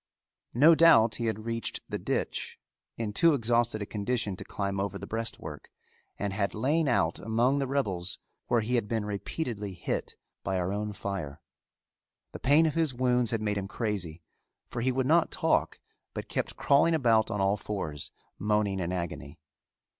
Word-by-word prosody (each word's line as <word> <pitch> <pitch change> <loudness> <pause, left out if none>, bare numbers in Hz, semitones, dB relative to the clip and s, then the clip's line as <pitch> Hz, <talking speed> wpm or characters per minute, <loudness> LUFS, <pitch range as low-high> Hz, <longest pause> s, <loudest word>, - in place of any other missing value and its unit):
No 150 +7 +8
doubt 120 -10 +6
he 115 - -1
had 110 0 -3
reached 115 -1 -2
the - - -3
ditch - - -2 0.4
in 110 -3 -3
too 165 +7 +5
exhausted 115 -3 +1
a - - -5
condition 105 -1 -1
to - - -8
climb 100 -1 -3
over 100 +1 -2
the - - -7
breastwork 115 0 -5 0.5
and 100 -1 -2
had 100 0 -1
lain 150 +8 +1
out 85 -10 +2
among 120 +5 +2
the 135 - 0
rebels 100 -10 -1 0.3
where 120 - +3
he 115 +3 -2
had 115 -4 +1
been 110 -1 -1
repeatedly 105 - -4
hit 85 - -3 0.3
by 95 - -1
our 90 +1 -1
own 105 +1 -2
fire. 95 -8 -5 0.9
The - - -8
pain 145 +5 +5
of 155 - +1
his 160 -6 +1
wounds 125 -1 +2
had 110 -2 -1
made 105 -1 0
him 95 - -4
crazy, 95 -7 -3 0.4
for 120 - -4
he 130 +2 +2
would 130 0 0
not 160 +4 +4
talk, - - +1 0.4
but - - -5
kept - - -2
crawling 150 +4 +4
about 115 -7 +3
on 105 -3 -2
all 95 +1 +3
fours 95 -8 -4 0.3
moaning 105 -1 +1
in 90 -1 -2
agony. 85 -4 -4
110 Hz, 175 wpm, -29 LUFS, 100-125 Hz, 0.9 s, No